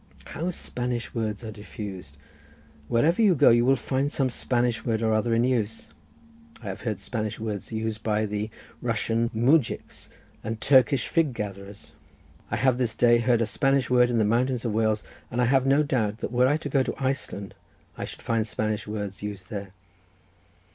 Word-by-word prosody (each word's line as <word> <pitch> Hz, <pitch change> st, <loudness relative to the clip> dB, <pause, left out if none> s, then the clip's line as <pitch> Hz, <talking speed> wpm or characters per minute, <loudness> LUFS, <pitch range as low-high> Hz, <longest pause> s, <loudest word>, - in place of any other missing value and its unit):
"How 170 Hz, +3 st, -4 dB
Spanish 125 Hz, -8 st, -3 dB
words 110 Hz, -2 st, -3 dB
are 110 Hz, -, -5 dB
diffused! 100 Hz, -7 st, -8 dB, 0.7 s
Wherever 155 Hz, -, +2 dB
you 200 Hz, -5 st, +5 dB
go 135 Hz, -, +6 dB
you 120 Hz, +1 st, +4 dB
will 135 Hz, +2 st, +4 dB
find 135 Hz, +3 st, -1 dB
some 135 Hz, -4 st, +1 dB
Spanish 120 Hz, -1 st, 0 dB
word 115 Hz, -1 st, -1 dB
or 110 Hz, -1 st, +2 dB
other 115 Hz, +2 st, +1 dB
in 115 Hz, -, +3 dB
use. 115 Hz, -4 st, -1 dB, 0.7 s
I -, -, -5 dB
have -, -, -6 dB
heard 110 Hz, -4 st, -2 dB
Spanish 110 Hz, +1 st, -4 dB
words 110 Hz, -2 st, -4 dB
used 110 Hz, -1 st, -3 dB
by 105 Hz, 0 st, -1 dB, 0.3 s
Russian 115 Hz, 0 st, 0 dB
mujiks, 125 Hz, +4 st, +1 dB, 0.3 s
and 110 Hz, +1 st, -4 dB
Turkish 130 Hz, -1 st, +4 dB
fig 160 Hz, -7 st, +1 dB
gatherers—I 100 Hz, +1 st, -9 dB
have 125 Hz, +2 st, +2 dB
this 115 Hz, -3 st, 0 dB
day 120 Hz, 0 st, +5 dB
heard 120 Hz, -1 st, +2 dB
a -, -, +1 dB
Spanish 135 Hz, +4 st, +1 dB
word 125 Hz, -1 st, +5 dB
in 120 Hz, -, +1 dB
the 110 Hz, -, +3 dB
mountains 120 Hz, +3 st, +1 dB
of 115 Hz, -, -1 dB
Wales, 110 Hz, -1 st, +1 dB, 0.3 s
and 120 Hz, -, -3 dB
I 125 Hz, -, +4 dB
have 135 Hz, +1 st, +3 dB
no 140 Hz, +3 st, +4 dB
doubt 115 Hz, -8 st, 0 dB
that -, -, -3 dB
were 125 Hz, +1 st, +4 dB
I 145 Hz, +3 st, +2 dB
to 155 Hz, -, -6 dB
go 135 Hz, -1 st, +3 dB
to -, -, -2 dB
Iceland 130 Hz, -7 st, -3 dB, 0.4 s
I -, -, -4 dB
should -, -, -9 dB
find 115 Hz, -1 st, 0 dB
Spanish 110 Hz, 0 st, -2 dB
words 105 Hz, -2 st, -5 dB
used 100 Hz, -3 st, -7 dB
there. 100 Hz, -2 st, -5 dB
115 Hz, 180 wpm, -26 LUFS, 110-130 Hz, 0.7 s, go